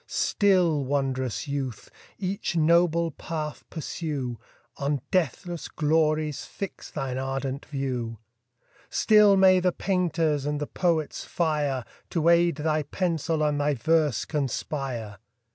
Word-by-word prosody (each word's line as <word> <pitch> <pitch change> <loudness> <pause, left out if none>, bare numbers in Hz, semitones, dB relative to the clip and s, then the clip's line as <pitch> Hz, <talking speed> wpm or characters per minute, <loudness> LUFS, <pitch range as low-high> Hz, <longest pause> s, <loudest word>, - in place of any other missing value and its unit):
Still, 180 -7 +2
wond'rous 135 0 -1
youth! 135 -5 -4 0.3
each 195 -1 -2
noble 170 +1 +3
path 155 0 -5
pursue, 145 -7 -4 0.4
On 140 -1 -1
deathless 175 0 -1
glories 155 -1 +1
fix 195 - -7
thine 130 -1 -3
ardent 135 +1 -3
view: 125 -5 -3 0.7
Still 210 -2 +5
may 190 -1 +6
the 180 0 +2
painter's 165 -6 0
and 150 0 -1
the 150 - -2
poet's 165 -2 -1
fire 150 -6 -1 0.2
To 165 -1 +2
aid 170 -1 +4
thy 155 +1 0
pencil, 165 -1 -1
and 145 -1 +1
thy 145 0 +1
verse 150 0 +2
conspire! 130 -6 -3
150 Hz, 115 wpm, -26 LUFS, 135-170 Hz, 0.7 s, may